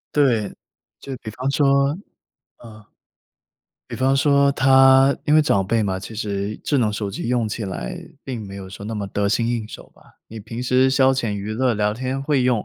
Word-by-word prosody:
对， 120 -8 +2 0.5
就 135 - -7
比 110 - -6
方 125 +5 -3
说 140 +1 +2 0.7
嗯， 110 -2 -13 1.0
比 - - -8
方 130 +1 +1
说 140 0 +3
她 135 0 +5
因 150 - +3
为 - - +7
长 100 -10 +1
辈 110 +2 0
嘛， 95 -1 -2
其 110 +3 -9
实 105 -1 -3
智 145 - +1
能 110 -3 +1
手 105 -1 -3
机 100 +4 -5
用 120 -3 0
起 110 +1 -4
来 90 -11 -5 0.3
并 120 -5 -5
没 100 0 -9
有 95 -1 -8
说 100 +1 -10
那 110 - -5
么 105 -2 -4
得 100 +1 -1
心 115 +2 +1
应 115 -2 -2
手 - - -11
吧。 - - -23
你 110 0 -9
平 115 +3 -7
时 130 +1 +2
消 135 0 +4
遣 130 -4 -1
娱 100 +1 -4
乐 125 0 +1
聊 105 0 0
天 130 +3 -3
会 140 -2 +1
用， 125 -4 +1
115 Hz, 220 characters per minute, -21 LUFS, 105-135 Hz, 1.0 s, 为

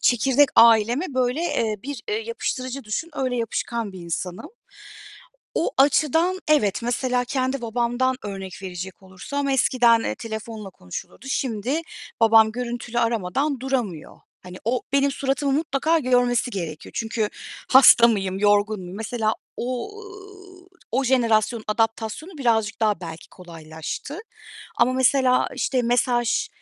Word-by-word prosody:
çekirdek 265 +4 +4
aileme 230 - +5
böyle, 255 +4 0
eee, 225 -10 0
bir, 280 0 -6
eee, 425 - 0
yapıştırıcı 275 - -4
düşün, 225 +11 -3
öyle 260 -3 -1
yapışkan 230 -2 -3
bir 185 - -9
insanım. 175 - -5 1.1
O 330 - 0
açıdan 320 +6 +3
evet, 245 -10 +2
mesela 245 +1 0
kendi 260 0 -2
babamdan 240 +3 0
örnek 195 -2 -7
verecek 185 +1 -7
olursam, 195 +10 -4
eskiden, 245 -3 +4
eee, - - -2
telefonla 220 -2 -7
konuşulurdu, 90 - -9
şimdi 260 +4 -1 0.4
babam 220 -1 +6
görüntülü 240 0 -4
aramadan 235 +5 0
duramıyor. 245 - -3 0.2
Hani, 180 0 -10
o 245 +3 0
benim 280 0 +3
suratımı 275 0 -1
mutlaka 310 +2 +1
görmesi 245 -3 +2
gerekiyor. 165 -7 -6
Çünkü, 225 -1 -1 0.4
hasta 255 -3 +8
mıyım, 195 -4 -1
yorgun 205 0 +2
muyum? 180 +1 -8
Mesela, 220 0 -1 0.2
ooo, 250 - -3 1.0
o 265 +3 +1
jenerasyonun 230 -3 +2
adaptasyonu 225 - -2
birazcık 225 -5 +1
daha 215 -3 +1
belki 165 -2 -9
kolaylaştı 165 - -8 0.6
ama 255 - +3
mesela 260 0 +3
işte 260 -2 0
mesaj 240 0 +1
240 Hz, 125 wpm, -23 LUFS, 210-265 Hz, 1.1 s, hasta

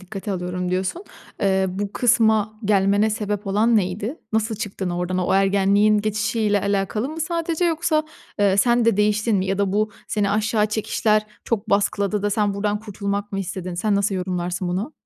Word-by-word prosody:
dikkate 195 +1 -6
alıyorum, 180 0 -3
diyorsun. 190 - -2 0.4
Eee, 190 -1 +2
bu 200 +2 -4
kısma 220 -3 +2
gelmene 205 +1 +3
sebep 210 -1 -3
olan 220 +4 +3
neydi? 205 - -1 0.2
Nasıl 220 0 0
çıktın 195 -4 -4
oradan? 180 +1 -2
O 180 - +1
ergenliğin 200 +2 +3
geçişiyle 210 0 0
alakalı 200 +5 -1
mı 320 +1 -6
sadece 335 +1 -1
yoksa, 320 -2 +1 0.3
eee, 200 -1 +3
sen 240 +2 +3
de 230 -4 +3
değiştin 210 +1 +2
mi? 190 0 0
Ya 195 +1 -1
da 195 -1 +1
bu 215 +1 +1 0.2
seni 205 -2 0
aşağı 215 0 +1
çekişler 215 0 0 0.2
çok 225 -1 -2
baskıladı 200 0 +1
da 205 - 0
sen 205 -1 +1
buradan 205 +1 -1
kurtulmak 205 -1 -4
mı 195 - -2
istedin? 185 -1 -5
Sen 205 +3 0
nasıl 200 0 +1
yorumlarsın 180 -1 -2
bunu? 195 - -3
205 Hz, 170 wpm, -22 LUFS, 195-215 Hz, 0.4 s, gelmene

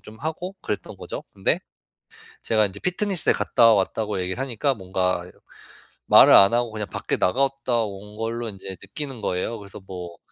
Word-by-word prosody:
좀 110 - -13
하고 160 +5 -4
그랬던 105 - -4
거죠. - - -7
근데 - - +1 0.9
제가 110 -2 +3
인제 100 +1 -11
피트니스에 185 -1 +1
갔다 115 -1 +4
왔다고 105 0 0
얘기를 90 +4 -3
하니까 135 +1 0
뭔가 90 -2 -1 0.8
말을 - - +8
안 100 +4 +8
하고 120 0 +1
그냥 105 -1 -4
밖에 - - -2
나갔다 130 +1 +1
온 105 +1 -9
걸로 115 +1 -3
인제 95 -1 -9
느끼는 135 -6 -7
거예요. 100 +4 -2
그래서 100 0 -11
뭐 90 -2 -8
110 Hz, 345 characters per minute, -24 LUFS, 95-125 Hz, 0.9 s, 말을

